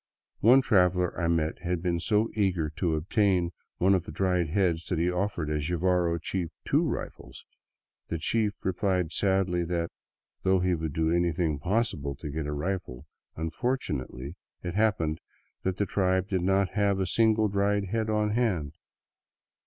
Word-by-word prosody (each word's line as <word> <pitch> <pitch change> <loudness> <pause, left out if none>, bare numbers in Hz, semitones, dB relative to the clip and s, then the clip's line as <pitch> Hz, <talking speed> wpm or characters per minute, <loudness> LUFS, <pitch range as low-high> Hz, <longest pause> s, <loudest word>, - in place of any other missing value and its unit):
One 130 +5 +6
traveler 90 -5 +3
I 85 - -1
met 80 -1 0
had 90 0 -2
been 85 -2 0
so 105 +5 +1
eager 90 -7 0
to 85 0 0
obtain 90 +1 +1 0.3
one 95 +2 +4
of 90 -3 +1
the - - -7
dried 90 0 +1
heads 85 -2 +1
that 90 - -2
he 85 +2 +1
offered 90 -4 -2
a 75 - 0
Jivaro 85 +1 +1
chief 85 +1 -3 0.2
two - - +3
rifles. - - -5 0.6
The 85 - -2
chief 105 +6 0
replied 95 -3 0
sadly 95 -3 +1
that, 85 -1 -2 0.5
though 95 0 +3
he 90 0 +1
would 80 -3 -3
do 80 +1 +1
anything 85 -3 +1
possible 85 - -1
to 75 - -7
get 75 0 -3
a - - -3
rifle, 75 -4 -4 0.3
unfortunately 80 - -3 0.3
it 90 -1 -3
happened 95 -7 +1 0.4
that 95 0 -2
the 100 - +1
tribe 95 -1 +1
did 95 -2 0
not 95 +1 +2
have 100 -1 +1
a 95 - +1
single 110 +3 +3
dried 100 0 0
head 110 +1 -1
on 105 -1 +1
hand. 95 -11 0
90 Hz, 160 wpm, -28 LUFS, 80-100 Hz, 0.6 s, One